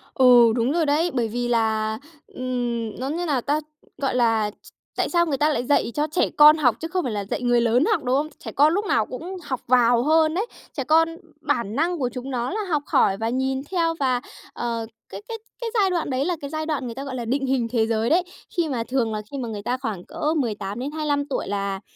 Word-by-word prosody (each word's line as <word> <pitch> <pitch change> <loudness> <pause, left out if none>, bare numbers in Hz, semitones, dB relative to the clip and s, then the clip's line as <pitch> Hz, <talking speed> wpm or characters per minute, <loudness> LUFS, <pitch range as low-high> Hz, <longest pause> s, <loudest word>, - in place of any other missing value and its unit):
Ừ, 245 -3 +7
đúng 240 +3 +1
rồi 330 -1 +1
đấy, 310 +5 +2
bởi 235 -3 0
vì 240 +2 -2
là, 220 -2 +1 0.3
ừm 240 -3 -3
nói 265 +3 -2
như 350 +2 -2
nào 285 -5 +1
ta? 290 +5 0 0.4
Gọi 275 -2 -1
là, 225 -4 +2
ch - - -16 0.3
tại - - +1
sao 345 -1 +2
người 295 -4 0
ta 300 - +3
lại 245 -4 -1
dạy 285 - +2
cho 300 +1 +1
trẻ 355 - +1
con 300 +1 +9
học 250 -6 +3
chứ 325 - -4
không 365 0 -1
phải 250 - -2
là 205 -1 -2
dạy 205 - -4
người 245 -1 +3
lớn 240 +4 +3
học, - - 0
đúng 250 0 +1
không? 295 +2 0
Trẻ 255 -10 -8
con 295 +6 +4
lúc 410 - 0
nào 225 - +1
cũng 335 +11 -7
học 260 -6 -4
vào 240 -1 +4
hơn 315 +2 +3
đấy. 400 +6 0 0.3
Trẻ 275 - -3
con 320 +4 +4 0.3
bản 235 -8 -1
năng 340 +4 +1
của 255 -4 0
chúng 250 +2 -6
nó 245 -2 -2
là 430 +3 -2
học 300 -3 +1
hỏi 195 - +3
và 225 +2 -2
nhìn 265 +2 -1
theo 335 -3 +1
và, 255 -3 +1 0.3
ờ, 230 -1 -3 0.2
cái 195 +1 -8
cái 455 - -4 0.2
cái 470 - -3
giai 400 -4 +3
đoạn 345 -5 -1
đấy 260 +1 0
là 355 +1 0
cái 280 -2 -6
giai 310 0 -3
đoạn 300 -4 -2
người 235 - -5
ta, 270 +3 -6
gọi 275 -2 -5
là, 240 - -4
định 270 +4 -1
hình 260 -3 0
thế 225 -2 +1
giới 225 0 0
đấy. 345 +4 +4 0.3
Khi 340 -2 +1
mà 245 -5 -2
thường 240 -3 0
là 215 0 -3
khi 280 - -5
mà 245 -3 -3
người 210 -2 -5
ta 245 +4 -1
khoảng 215 -9 -4
cỡ 305 +2 -2
18-25 280 +5 -2
tuổi 280 - -3
là 200 -1 -2
260 Hz, 250 wpm, -23 LUFS, 230-305 Hz, 0.4 s, con